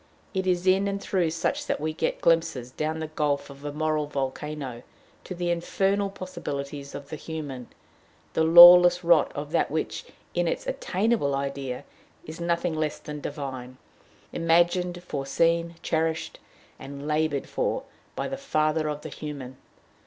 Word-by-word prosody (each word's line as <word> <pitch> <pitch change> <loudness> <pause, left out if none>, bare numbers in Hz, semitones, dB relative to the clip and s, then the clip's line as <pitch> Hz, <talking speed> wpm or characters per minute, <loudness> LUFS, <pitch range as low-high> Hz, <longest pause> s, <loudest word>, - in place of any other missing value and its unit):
It 190 -1 -1
is 180 0 +1
in 190 +2 +4
and 200 0 -2
through 185 -4 0
such 280 - -2
that - - -1
we 155 +1 -2
get - - -2
glimpses, 165 -7 +1
down 155 +3 -2
the 160 - -3
gulf 145 -2 -1
of 140 +1 -14
a 145 - -4
moral 155 0 -1
volcano, 135 -2 -4 0.4
to 185 - -6
the 175 0 -1
infernal 195 +4 0
possibilities 145 -7 -6
of 140 0 -8
the 155 - -5
human 145 -6 -6 0.7
the 160 - +2
lawless 175 +2 +9
rot 170 -2 +4
of 145 +1 -5
that - - +1
which, - - -3 0.3
in - - +1
its - - -2
attainable 235 - 0
idea, 140 -2 -4 0.4
is 160 +2 -8
nothing 170 0 0
less 155 -1 -1
than 150 -1 -8
divine, 130 -3 -6 0.6
imagined, 175 +1 +2
foreseen, 165 +3 0
cherished, 160 0 -1 0.4
and 140 +1 -8
labored 155 -2 0
for, - - -1 0.3
by - - -2
the 270 - -4
Father 155 - 0
of 150 0 -4
the - - -7
human. 140 -4 -7
160 Hz, 150 wpm, -26 LUFS, 145-175 Hz, 0.7 s, lawless